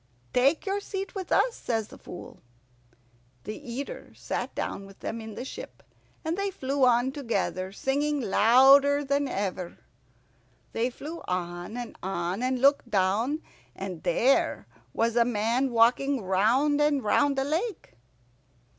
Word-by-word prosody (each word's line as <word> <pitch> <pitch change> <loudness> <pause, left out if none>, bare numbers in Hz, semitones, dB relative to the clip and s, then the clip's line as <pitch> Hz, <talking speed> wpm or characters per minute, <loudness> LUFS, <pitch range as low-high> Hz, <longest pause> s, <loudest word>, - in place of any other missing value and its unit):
"Take 275 +5 +3
your 395 +1 0
seat 390 -1 -5
with 380 -3 -6
us," - - +3
says 225 -2 -2
the - - -12
Fool. 175 - -10 1.0
The 215 - -5
Eater 280 - -7
sat - - -4
down 195 0 -4
with 195 - -16
them 230 0 -4
in 220 -1 -8
the 250 - -5
ship, - - -9 0.4
and 320 +1 0
they 395 +1 -1
flew 275 -6 -2
on 245 +2 +3
together, 200 -8 -2
singing 285 +7 0
louder 270 +6 +5
than 280 +1 +1
ever. 190 -6 -3 1.0
They 235 +2 0
flew 310 +6 -8
on 175 +4 -3
and 240 -2 -6
on, 185 +1 -2
and 255 0 0
looked 275 -1 +3
down, 215 +9 +1 0.3
and 185 -4 -6
there 255 +10 +2 0.3
was 230 0 0
a 240 - +5
man 235 +3 0
walking 245 +2 +3
round 235 +11 +2
and 295 -3 +2
round 275 +6 +2
a 270 - +2
lake. 340 - -3
250 Hz, 145 wpm, -27 LUFS, 210-285 Hz, 1.0 s, louder